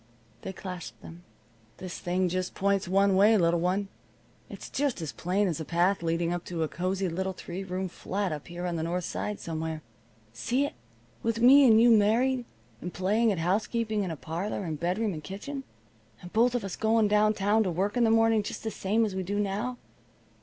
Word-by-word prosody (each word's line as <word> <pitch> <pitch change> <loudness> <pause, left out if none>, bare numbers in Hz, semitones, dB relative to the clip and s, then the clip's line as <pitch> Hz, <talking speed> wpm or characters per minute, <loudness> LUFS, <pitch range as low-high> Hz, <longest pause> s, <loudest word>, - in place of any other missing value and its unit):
They - - -5
clasped 180 -2 -8
them. 170 +2 -11 0.5
"This 185 -1 -7
thing 180 +1 0
just 185 +1 -3
points 195 -1 +1
one 195 +1 +3
way, 210 +3 +6
little 170 -2 +2
one. 185 +4 0 0.6
It's - - -8
just 280 -5 -1
as 160 -3 -4
plain 190 +4 0
as 170 -3 -2
a - - -3
path 175 +4 +1
leading 165 +1 0
up 175 -1 -3
to 170 -2 -2
a - - 0
cozy 185 +4 -2
little 190 +3 -2
three 180 +1 -6
room 190 0 -3
flat 190 +2 -3
up 150 -1 -6
here 175 +1 -6
on 175 -1 -2
the - - -2
North 175 +2 -2
Side 210 +4 -4
somewhere. 160 -1 -4 0.5
See 250 - 0
it? - - -5 0.5
With 230 0 -1
me 265 +3 +8
and 220 -2 +7
you 235 +1 +6
married, 235 +4 +3 0.4
and 175 - -5
playing 210 +6 +2
at 195 - -1
housekeeping 215 +5 0
in 185 - -3
a 165 - -3
parlor 175 +7 -4
and 160 -4 -4
bedroom 185 +5 0
and 155 -2 -7
kitchen? 265 - -6 0.6
And 175 - -10
both 240 +3 +3
of 240 - -1
us 190 - -4
going 220 0 +2
down 210 +1 +3
town 205 +3 +2
to 200 - +1
work 190 +5 -1
in 245 - +3
the 225 - +4
morning 225 -1 +4
just 205 - -6
the 220 - -2
same 215 +4 +1
as 205 - -3
we 190 - -2
do 200 +3 -3
now. 210 +5 -2
195 Hz, 210 wpm, -28 LUFS, 175-220 Hz, 0.6 s, me